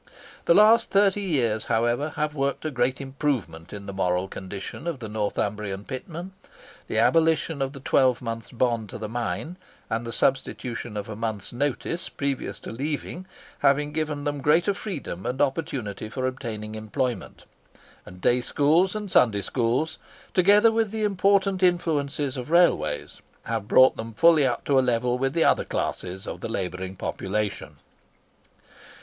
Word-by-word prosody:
The 170 - +5
last 215 +3 +6
thirty 200 0 +3
years, 120 - 0
however, 120 +6 0
have 150 0 -1
worked 140 +1 -2
a 155 - -1
great 125 0 0
improvement 135 - -3
in 100 -1 -8
the 100 - -6
moral 90 0 0
condition 100 - -7
of 170 -4 -2
the 115 -3 -7
Northumbrian 105 -1 -2
pitmen; 170 +8 -6 0.6
the - - -2
abolition 160 -2 +3
of 135 0 0
the 140 - -9
twelve 130 -2 +3
months' 115 -4 -5
bond 115 -3 0
to - - -7
the 110 - -5
mine, 120 +9 -3 0.3
and 115 +1 0
the 115 - -5
substitution 120 -4 -1
of 105 +2 -4
a 110 - -6
month's 110 -1 -4
notice 145 +6 -2
previous 140 -2 -3
to - - -7
leaving, 150 +8 -4 0.3
having 145 +1 +3
given 150 -2 -2
them 145 -1 -2
greater 165 +8 +3
freedom 170 - -5
and 125 +2 -3
opportunity 135 -8 -2
for 130 +3 -3
obtaining 115 -5 -4
employment; 110 0 -3 0.6
and 90 0 -13
day 125 +5 +3
schools 160 +9 +2
and 210 -3 -4
Sunday 105 -5 +4
schools, 125 +8 0 0.3
together 205 +4 +6
with 225 -1 +1
the 220 +1 -3
important 195 -1 +2
influences 150 -6 +1
of 125 +2 -5
railways, 170 - +2 0.2
have 115 -3 -3
brought 130 +3 +6
them 115 0 -6
fully 160 -1 +5
up 120 - -2
to 140 -2 +4
a - - +5
level 125 0 +1
with 135 +1 0
the 165 0 +3
other - - +3
classes 95 +3 -3
of - - -6
the - - -4
labouring 95 -3 -4
population. 100 +2 -3
130 Hz, 160 wpm, -25 LUFS, 110-160 Hz, 0.6 s, last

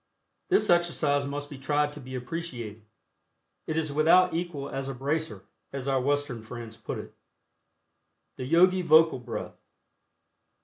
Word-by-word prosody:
This 390 - +3
exercise 155 -5 +2
must 145 +1 -4
be 145 -3 -10
tried 145 +2 +1
to 150 - -9
be 130 -1 -8
appreciated. 125 -6 -5 0.9
It 155 - -1
is 155 -3 0
without 170 +5 +5
equal 165 -5 -3
as 135 0 -4
a 135 - -4
"bracer," 155 +5 -2 0.3
as 135 -1 -5
our 135 -1 +2
Western 145 -3 -1
friends 115 0 -8
put 110 - -6
it. - - -9 1.2
THE 130 - -5
YOGI 180 +6 +4
VOCAL 160 -4 +5
BREATH. 120 -1 -6
145 Hz, 140 wpm, -28 LUFS, 130-165 Hz, 1.2 s, without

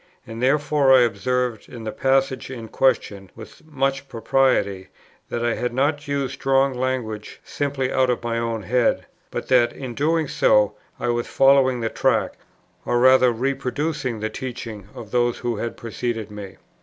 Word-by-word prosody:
And 115 +1 -8
therefore 140 +1 +3
I 130 -1 +8
observe 120 +1 -1
in 120 -2 -9
the 110 - -3
passage 135 0 0
in 115 -4 -7
question, 100 -7 0
with 110 +9 -13
much 135 -2 -2
propriety, 115 -5 +1 0.4
that 120 0 -2
I 120 - +1
had 125 -1 -3
not 145 +2 0
used 140 -2 -2
strong 135 0 +2
language 125 -4 -3
simply 135 -2 -2
out 130 -1 +2
of 120 -1 -1
my 115 0 -1
own 115 -2 -2
head, 125 +4 +1 0.2
but - - -5
that 120 -2 +4
in 130 -3 -7
doing 155 +4 +1
so 105 -5 +3 0.3
I 120 - -1
was 120 0 -1
following 135 -2 +4
the 115 - -1
track, - - 0 0.4
or 120 - 0
rather 130 0 +6
reproducing 135 0 -2
the 110 - -2
teaching, 115 -6 -7
of 110 - -9
those 120 -1 +1
who 120 -3 -3
had 115 +2 -4
preceded 115 -2 -4
me. 100 -2 -9
125 Hz, 165 wpm, -22 LUFS, 115-135 Hz, 0.4 s, I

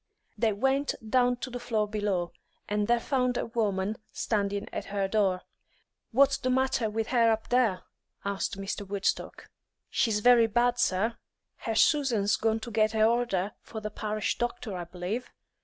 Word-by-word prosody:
They 225 -2 +2
went 270 +7 +1
down 245 +2 +3
to 260 - -4
the 245 - -4
floor 220 -3 0
below, 205 -5 -1 0.4
and 210 0 0
there 240 0 +3
found 250 -1 0
a - - -1
woman 210 -3 -1
standing 200 -2 -1
at - - -4
her 200 -1 -1
door. 195 -3 +1 0.7
"What's 270 +3 +4
the 255 - -1
matter 260 -3 +1
with 220 +1 -2
her 235 -2 +4
up 220 0 -2
there?" 230 -7 +2 0.4
asked 200 -1 -2
Mr. 195 +1 -4
Woodstock. 200 0 -3 0.4
"She's 215 -4 +1
very 240 0 +6
bad, 240 +2 +2
sir. 215 +5 +1 0.4
Her 225 - -3
Susan's 230 -7 +3
gone 225 0 +1
to 235 - -6
get 215 0 +2
a 215 - +3
order 225 -4 +1
for 220 - -7
the 215 0 -5
parish 215 0 -2
doctor, 240 -3 -3
I 175 -1 -4
b'lieve. 180 +8 -4
220 Hz, 165 wpm, -28 LUFS, 200-245 Hz, 0.7 s, very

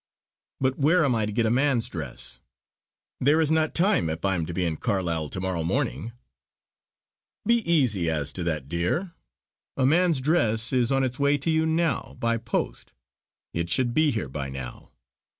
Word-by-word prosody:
"But 130 +1 0
where 160 +4 +4
am 135 - +2
I 110 -2 0
to - - -3
get 115 +2 +1
a 110 - +2
man's 130 -2 +2
dress? 75 -8 -6 0.8
There 145 +5 +3
is 160 -1 +2
not 160 -1 +1
time 185 - +2
if 80 +4 -4
I 95 - +2
am 85 -4 -2
to 85 - -5
be 90 +1 0
in 80 -2 -2
Carlisle 85 -8 -1
to 95 - -5
morrow 95 -3 -2
morning." 115 - -2 1.3
"Be 235 0 +4
easy 110 - +2
as 75 -3 0
to 90 - -3
that, 75 -5 -2
dear. 90 - -1 0.6
A 130 - +2
man's 165 +1 +3
dress 125 -6 +1
is 125 0 +2
on 135 0 +2
its 130 +1 -2
way 140 +1 +3
to 145 +4 -1
you 160 0 +2
now 160 -3 -1
by 115 0 +1
post. 115 0 -4 0.6
It 85 0 -2
should 120 +4 +2
be 155 +2 +3
here 110 - -2
by 70 0 -5
now. 65 -2 -8
115 Hz, 185 wpm, -25 LUFS, -, 1.3 s, where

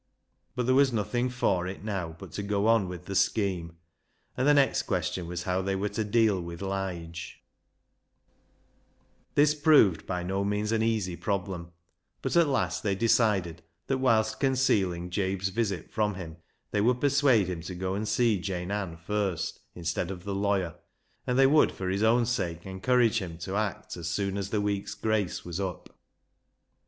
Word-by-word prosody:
But 125 - -1
there 130 - +3
was 135 0 +5
nothing 120 +3 0
for 95 -8 0
it 95 +1 -7
now 95 -6 -3
but - - -10
to - - -4
go 100 0 0
on 115 -4 +4
with 90 -1 -7
the 100 - -5
scheme, 90 -5 0 0.6
and 130 - +1
the 145 - +7
next 140 -1 +3
question 90 -2 -2
was 90 0 -4
how 90 +1 0
they 95 +1 -1
were 100 +2 -1
to 110 - -2
deal 105 -2 +2
with 85 -1 -7
Lige, 90 -4 -5 1.9
This 145 +1 +5
proved 145 - +4
by 90 -1 -2
no 95 +2 -1
means 105 +2 -1
an 115 -1 +1
easy 110 -6 0
problem, 90 -1 -3 0.5
but - - -1
at 170 -2 +5
last 135 -2 0
they 100 -2 0
decided 100 -6 +2 0.2
that, 135 +4 -1
whilst 110 -4 +2
concealing 95 -10 +1
Jabe's 95 0 -1
visit 100 -5 -2
from 105 -2 0
him, 85 -3 -8 0.3
they 105 - +1
would 120 +3 +2
persuade 140 -6 +4
him 90 -3 -4
to 90 +2 -7
go 95 +1 -2
and 105 +2 -2
see 110 -1 +2
Jane 90 0 -4
Ann 95 -5 -3
first 95 0 -2 0.2
instead 85 0 -2
of 90 -2 -6
the 100 0 -3
lawyer, 100 -3 0 0.5
and 125 - +1
they 135 - +6
would 150 +3 +5
for 95 -1 -4
his 95 +2 -1
own 115 +2 +4
sake 90 -8 -2
encourage 115 +5 +2
him 85 -5 -6
to 95 +3 -5
act 105 -2 -2
as 85 -2 -5
soon 100 +2 -1
as 100 -1 -3
the 105 0 0
week's 100 -1 -2
grace 110 -4 -1
was 90 +1 -4
up. 95 -4 -5
100 Hz, 180 wpm, -28 LUFS, 90-115 Hz, 1.9 s, the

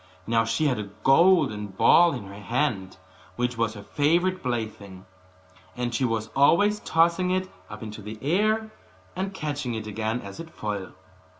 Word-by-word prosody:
Now 115 0 +2
she 115 +8 0
had 130 -6 +1
a 100 -1 -5
golden 135 - +4
ball 165 - +5
in 125 -6 -5
her 100 0 -10
hand, 105 -4 -2 0.4
which 125 0 -1
was 115 -1 -1
her 100 - -9
favourite 175 - +1
plaything; 110 -6 -5 0.7
and 120 -1 -2
she 130 +3 +1
was 110 -2 -2
always 205 +10 +4
tossing 170 +1 +2
it 185 0 0 0.2
up - - -8
into 110 0 -8
the 105 +2 -8
air, 215 +8 +1 0.4
and 190 +2 -2
catching 145 -9 -3
it 110 -1 -5
again 110 +2 -2
as 100 +8 -10
it 165 0 -8
fell. 105 - -5
125 Hz, 165 wpm, -25 LUFS, 110-170 Hz, 0.7 s, ball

